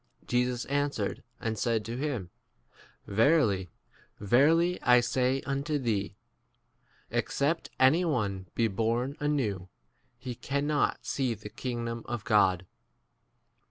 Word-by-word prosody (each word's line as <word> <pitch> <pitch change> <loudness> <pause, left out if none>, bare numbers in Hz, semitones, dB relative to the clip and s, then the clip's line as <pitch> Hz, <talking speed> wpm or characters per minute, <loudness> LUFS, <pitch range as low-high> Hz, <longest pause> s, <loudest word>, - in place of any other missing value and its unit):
Jesus 125 0 0
answered 140 -7 -1 0.2
and 110 -2 -3
said 115 -3 0
to 115 +2 -4
him, 125 - -3 0.7
Verily, 105 - +3 0.5
verily, 155 - +3
I 125 0 +6
say 130 +2 +1
un 140 -1 -2
to 150 -1 0
thee, 105 -7 -1 1.0
Except 155 +4 0
any 140 +7 +5
one 105 - -1
be 115 - +2
born 115 +6 -1
anewP 125 -11 -1 0.5
he 125 0 -6
cannot 140 +4 -1
see 130 -4 -1
the 105 0 -10
kingdom 115 0 -4
4 - - -5
of 120 -3 -4
God. 95 -6 +3
120 Hz, 120 wpm, -29 LUFS, 105-140 Hz, 1.0 s, I